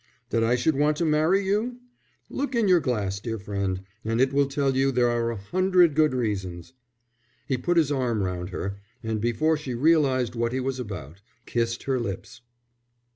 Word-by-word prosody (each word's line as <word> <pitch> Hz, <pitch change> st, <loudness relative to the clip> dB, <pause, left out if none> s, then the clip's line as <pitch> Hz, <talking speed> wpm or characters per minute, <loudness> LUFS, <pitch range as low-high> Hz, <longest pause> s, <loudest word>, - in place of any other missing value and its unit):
"That 115 Hz, -1 st, +2 dB
I 115 Hz, +2 st, +3 dB
should 135 Hz, +5 st, +1 dB
want 150 Hz, +2 st, +2 dB
to 170 Hz, -, 0 dB
marry 160 Hz, +6 st, +2 dB
you? 215 Hz, +5 st, 0 dB, 0.5 s
Look 275 Hz, -2 st, -3 dB
in 230 Hz, -3 st, +2 dB
your 180 Hz, -2 st, +6 dB
glass, 105 Hz, -9 st, -1 dB
dear 115 Hz, +1 st, -4 dB
friend, 100 Hz, -2 st, -3 dB, 0.2 s
and 115 Hz, +1 st, -1 dB
it 135 Hz, +1 st, +3 dB
will 140 Hz, 0 st, +3 dB
tell 135 Hz, -1 st, 0 dB
you 135 Hz, +1 st, +2 dB
there 120 Hz, -1 st, +2 dB
are 115 Hz, 0 st, 0 dB
a 115 Hz, -, -3 dB
hundred 180 Hz, -, +3 dB
good 155 Hz, -2 st, +3 dB
reasons." 95 Hz, -6 st, -3 dB, 0.7 s
He 135 Hz, -, 0 dB
put 175 Hz, +8 st, 0 dB
his 155 Hz, -3 st, +3 dB
arm 120 Hz, -7 st, 0 dB
round 90 Hz, -1 st, -3 dB
her, 100 Hz, +1 st, -4 dB, 0.2 s
and 110 Hz, -1 st, -2 dB
before 120 Hz, +8 st, +1 dB
she 135 Hz, -5 st, -5 dB
realized 130 Hz, -4 st, +3 dB
what 120 Hz, 0 st, -1 dB
he 130 Hz, -, 0 dB
was 130 Hz, 0 st, -2 dB
about, 100 Hz, -, -7 dB, 0.2 s
kissed 115 Hz, 0 st, -1 dB
her 135 Hz, -2 st, 0 dB
lips. 100 Hz, -1 st, -6 dB
125 Hz, 185 wpm, -26 LUFS, 110-150 Hz, 0.7 s, your